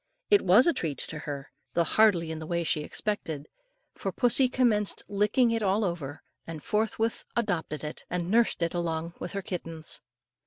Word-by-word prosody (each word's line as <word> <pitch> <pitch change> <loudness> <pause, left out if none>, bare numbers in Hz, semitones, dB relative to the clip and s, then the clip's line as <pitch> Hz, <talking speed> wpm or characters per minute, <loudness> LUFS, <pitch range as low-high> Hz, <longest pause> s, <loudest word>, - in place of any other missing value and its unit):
It 410 - +7
was 200 +8 +6
a 340 - +4
treat 155 - -3
to 150 - -2
her, 140 -2 -6 0.2
though 170 - +4
hardly 175 -2 +3
in 160 - -4
the 155 - -7
way 170 0 0
she 155 -1 +1
expected, 160 -4 -3 0.5
for - - -4
pussy 250 +1 +3
commenced 225 -6 +2
licking 210 +4 +2
it 230 0 0
all 205 +1 +2
over, 160 -5 -4 0.2
and 160 -3 -7
forthwith 220 +1 0
adopted 175 - -1
it, 150 +1 -6
and 175 +1 -2
nursed 230 -6 +3
it 165 - 0
along 170 -1 -2
with 175 - -5
her 200 -1 -3
kittens. 165 -4 -4
175 Hz, 180 wpm, -28 LUFS, 160-215 Hz, 0.5 s, It